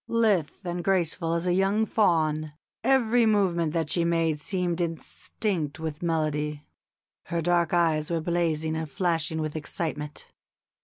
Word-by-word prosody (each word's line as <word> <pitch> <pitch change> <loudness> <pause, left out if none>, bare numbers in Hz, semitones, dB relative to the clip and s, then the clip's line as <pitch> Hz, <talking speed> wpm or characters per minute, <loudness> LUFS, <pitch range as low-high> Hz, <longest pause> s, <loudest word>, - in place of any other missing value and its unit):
Lithe 205 -7 +1
and 175 0 -3
graceful 170 -3 +1
as 170 +1 -2
a 180 - +2
young 195 +4 +2
fawn, 155 -8 +1 0.3
every 245 -3 +4
movement 180 -7 +2
that 160 -3 -1
she 170 - +2
made 165 -3 +1
seemed 180 0 -1
instinct 165 -1 -3
with 160 -1 -5
melody. 150 -3 -1 0.6
Her 170 - -2
dark 170 0 +2
eyes 160 -3 +2
were 170 -1 0
blazing 160 -2 0
and 160 -1 -3
flashing 165 -1 0
with 155 0 -3
excitement. 150 -1 -4
165 Hz, 140 wpm, -27 LUFS, 155-180 Hz, 0.6 s, every